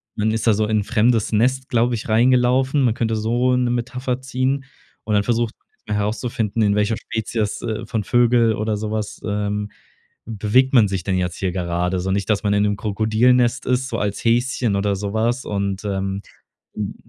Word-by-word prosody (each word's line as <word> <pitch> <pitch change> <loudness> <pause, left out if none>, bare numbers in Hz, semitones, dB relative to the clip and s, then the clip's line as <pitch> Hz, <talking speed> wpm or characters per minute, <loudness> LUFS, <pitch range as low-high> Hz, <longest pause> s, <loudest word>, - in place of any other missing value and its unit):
man 110 0 0
ist 110 0 -2
da 115 - +5
so 110 +1 +1
in 110 0 +1
'n - - -5
fremdes 115 0 +1
Nest, 130 +4 +1
glaube 120 -1 +2
ich, 115 - -6
reingelaufen. 125 +4 +3
Man 120 -3 +3
könnte 115 -1 -1
so 120 +4 +1
'ne 125 -1 +1
Metapher 125 +1 -2
ziehen 130 +1 -1 0.4
und 110 - -1
dann 105 -1 +3
versucht 120 0 0 0.3
man 105 - -2
herauszufinden, 110 +1 -1
in 100 -1 +2
welcher 105 +1 +1
Spezies, 110 -1 -3
äh, 110 -1 -4
von 110 -2 -2
Vögel 120 0 +3
oder 110 +1 -1
so 105 +1 -4
was, 110 -1 -4
ähm, 105 0 -2 0.6
bewegt 115 +5 +2
man 115 -5 +6
sich 95 -3 -3
denn 95 -2 0
jetzt 90 -1 -2
hier 95 -2 -1
gerade? 90 0 -1
So 95 +1 -2
nicht 100 +1 -1
dass 105 -1 +1
man 100 -1 +1
in 100 0 +3
'nem 105 0 +1
Krokodil-Nest 115 +4 +2
ist, 125 +1 0
so 115 - -3
als 100 0 -2
Häschen 120 -2 +1
oder 100 0 0
so 100 +1 -4
was 120 +4 0
und, 100 0 -3
ähm, 95 -1 -2 0.5
hm, 105 -2 -4
110 Hz, 195 wpm, -21 LUFS, 105-120 Hz, 0.6 s, man